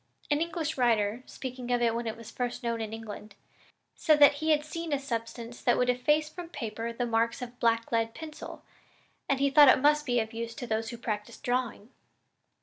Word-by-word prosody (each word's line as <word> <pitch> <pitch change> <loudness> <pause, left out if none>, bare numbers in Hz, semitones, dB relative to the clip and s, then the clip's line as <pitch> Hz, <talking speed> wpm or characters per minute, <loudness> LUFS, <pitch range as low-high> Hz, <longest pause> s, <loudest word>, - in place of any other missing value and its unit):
An 290 +1 +2
English 320 -3 -2
writer, 225 -2 +2
speaking 255 -2 -7
of 245 - +3
it 235 -1 +2
when 235 0 -3
it 220 - -4
was 230 -1 -10
first 245 -1 -3
known 230 -1 -1
in 220 -1 -4
England, 215 -2 -8 0.6
said 310 -3 +3
that 290 0 +8
he 315 - 0
had 300 -1 +3
seen 330 +1 -5
a 285 - +2
substance 235 -2 -5
that 240 - +3
would 250 0 +3
efface 295 +5 +1
from 340 +2 -9
paper 230 -6 -4
the 240 +1 -2
marks 230 0 +1
of 250 - -5
a 245 - -26
black 230 -1 +2
lead 225 -1 0
pencil, 315 -1 -9 0.7
and 275 -1 +2
he 280 0 +2
thought 290 -1 +8
it - - +7
must 295 +2 +4
be 245 -1 +2
of 220 0 -3
use 230 0 -5
to 245 - -6
those 225 0 -2
who 235 - -7
practiced 210 -3 -5
drawing." 245 -2 -2
245 Hz, 215 wpm, -29 LUFS, 230-285 Hz, 0.7 s, that